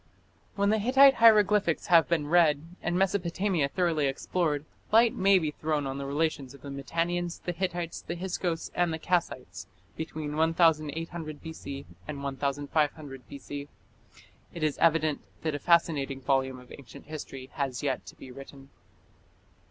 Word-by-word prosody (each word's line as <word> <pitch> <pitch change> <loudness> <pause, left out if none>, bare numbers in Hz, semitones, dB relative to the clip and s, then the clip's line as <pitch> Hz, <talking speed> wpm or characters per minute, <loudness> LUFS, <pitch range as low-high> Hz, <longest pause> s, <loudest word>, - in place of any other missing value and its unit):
When 200 0 +2
the 220 - +2
Hittite 270 +5 +6
hieroglyphics 210 -6 +5
have 165 -3 +5
been 165 -3 +1
read 155 -2 +3 0.2
and 175 0 -1
Mesopotamia 185 -4 0
thoroughly 165 -4 +1
explored, 150 +2 -1 0.3
light 225 +1 +5
may 195 +1 +4
be 155 -4 -1
thrown 150 -1 -2
on 135 0 -4
the 140 - -4
relations 145 -2 -1
of 140 - -16
the 140 - -7
Mitannians, 170 +5 -2
the 175 - -2
Hittites, 175 -1 -3
the 170 - -5
Hyksos, 175 -2 -3
and 175 -1 +1
the 160 - -2
Kassites 155 - -2 0.3
between 155 -2 -5
1800 160 -1 +1
B.C. 140 -4 -7 0.2
and 140 -2 -6
1500 140 0 -2
B.C. 140 0 -7 0.9
It 170 - -4
is 150 -2 0
evident 155 -2 +2 0.2
that 155 -2 -1
a 145 - -3
fascinating 145 -4 +2
volume 135 -1 0
of 125 0 -16
ancient 135 -5 -12
history 135 -4 -8
has 135 -3 -3
yet 135 -3 -1
to - - -10
be 130 - -11
written. 135 +1 -12
155 Hz, 150 wpm, -28 LUFS, 140-175 Hz, 0.9 s, Hittite